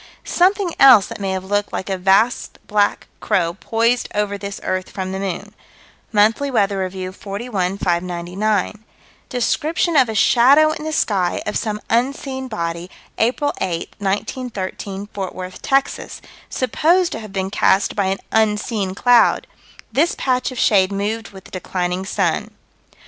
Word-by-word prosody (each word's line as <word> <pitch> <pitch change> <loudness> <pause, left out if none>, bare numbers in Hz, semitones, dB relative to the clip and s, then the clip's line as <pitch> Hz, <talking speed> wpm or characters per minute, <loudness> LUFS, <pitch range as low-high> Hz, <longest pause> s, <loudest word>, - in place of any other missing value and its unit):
Something 370 0 +2
else 255 -7 +8
that - - -8
may 195 -1 -2
have 190 -1 -2
looked 205 +1 -1
like - - -4
a 195 - -1
vast 195 +6 +2
black 205 -1 +1
crow 170 -3 0
poised 230 +5 0
over 205 -1 0
this 200 0 -6
earth 185 0 -2
from 190 -1 -5
the 190 - -3
moon: 195 +2 -4 0.6
Monthly 220 +6 +3
Weather 200 -6 +1
Review, 185 0 -4
41 200 -1 -3
599: 180 +4 -1 0.5
Description 315 +7 0
of 260 -5 +5
a 220 - -3
shadow 275 +8 +5
in 310 0 -5
the 315 - -2
sky, 195 - 0
of 210 - -3
some 210 -2 -2
unseen 265 +2 -1
body, 170 -5 -4 0.3
April 260 +5 +1
8, 170 -3 -3
1913, 200 -1 -3
Fort 190 -2 -5
Worth, 185 0 -7
Texas 275 0 -1 0.3
supposed 335 +8 +2
to - - -4
have 215 -2 -9
been 190 0 -3
cast 195 -1 +2
by 200 - +1
an 190 +1 0
unseen 210 -2 0
cloud 245 +2 +4 0.5
this 300 +9 +2
patch 255 0 0
of 255 - -8
shade 195 -4 +3
moved 210 +3 -3
with 190 -1 -13
the - - -16
declining 180 0 -3
sun. - - 0
205 Hz, 150 wpm, -20 LUFS, 190-245 Hz, 0.6 s, else